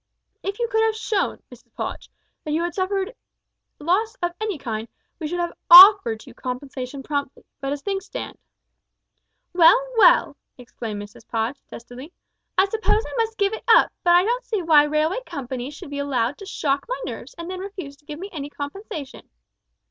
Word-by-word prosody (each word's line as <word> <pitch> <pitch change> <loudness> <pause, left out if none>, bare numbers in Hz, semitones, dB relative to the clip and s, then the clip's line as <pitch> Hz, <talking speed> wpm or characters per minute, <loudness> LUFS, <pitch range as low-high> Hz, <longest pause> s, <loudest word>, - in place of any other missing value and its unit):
If 400 +1 -4
you 475 - -1
could 445 -1 +1
have 445 -1 +2
shown, 435 -2 -2
Mrs - - -18
Podge, - - -5 0.3
that 300 - -3
you 325 +2 +1
had 345 - -2
suffered 385 +3 -2 0.6
loss 390 +9 0
of 350 - +1
any 425 -5 -2
kind, 225 -4 -5 0.3
we 315 - -3
should 350 +3 -3
have 345 0 -2 0.2
offered 360 - +9
you 260 - -13
compensation 255 +1 -6
promptly, 285 -2 -4
but 275 0 -3
as 285 0 -4
things 390 -1 -3
stand - - -7 0.6
" - - -53
"Well, 350 +7 +7 0.2
well," - - +5 0.2
exclaimed 230 -4 -7
Mrs 205 - -15
Podge, 230 +4 -2
testily. 245 +6 -11 0.5
"I 380 - +6
suppose 440 +1 0
I - - -9
must 450 0 -6
give 400 0 +1
it 440 - -6
up, 460 - +6
but 345 0 +5
I 355 - +6
don't 485 +4 -1
see 425 -5 -2
why 305 -3 +6
railway 305 +7 0
companies 260 +1 -6
should 290 - -10
be 285 - -4
allowed 270 -2 -1
to 395 - -9
shock 280 -7 -1
my - - -2
nerves - - -8
and 335 - -7
then 370 0 -5
refuse 375 -7 -7
to 290 - -30
give 295 0 -7
me 385 +5 -7
any 290 -3 -5
compensation!" 290 - -8
325 Hz, 185 wpm, -23 LUFS, 275-395 Hz, 0.6 s, offered